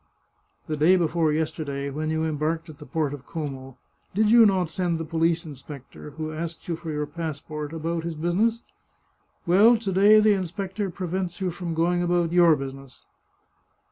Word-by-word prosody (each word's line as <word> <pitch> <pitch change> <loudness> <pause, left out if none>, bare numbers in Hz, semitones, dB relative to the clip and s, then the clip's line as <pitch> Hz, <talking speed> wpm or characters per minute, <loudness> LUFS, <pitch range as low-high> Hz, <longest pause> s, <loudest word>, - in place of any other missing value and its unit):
" - - -42
The 155 - -2
day 160 +5 +5
before 165 -2 +1
yesterday, 145 -3 -2
when 155 +2 -3
you 160 0 0
embarked 160 +2 -1
at 150 - -12
the - - -11
port 145 +1 -1
of 140 -2 -10
Como, 135 -5 -6 0.4
did 215 +1 +3
you 230 -1 +8
not 185 -5 0
send 175 -1 -1
the 165 - -4
police 165 +1 0
inspector, 140 -1 -10
who 155 0 -4
asked 165 +1 -6
you 170 - -1
for 165 0 -8
your 150 -1 -2
passport, 150 -2 -6
about 165 +1 -3
his 170 -1 -4
business? 200 +9 0 0.8
Well, 210 +7 +6
to 215 -3 -3
day 205 +3 +6
the 215 0 +5
inspector 195 +1 -3
prevents 180 0 -4
you 185 -2 -1
from 170 -1 -5
going 175 +2 +1
about 175 -1 +1
your 170 -2 +6
business." 135 -1 -9
165 Hz, 175 wpm, -25 LUFS, 155-180 Hz, 0.8 s, you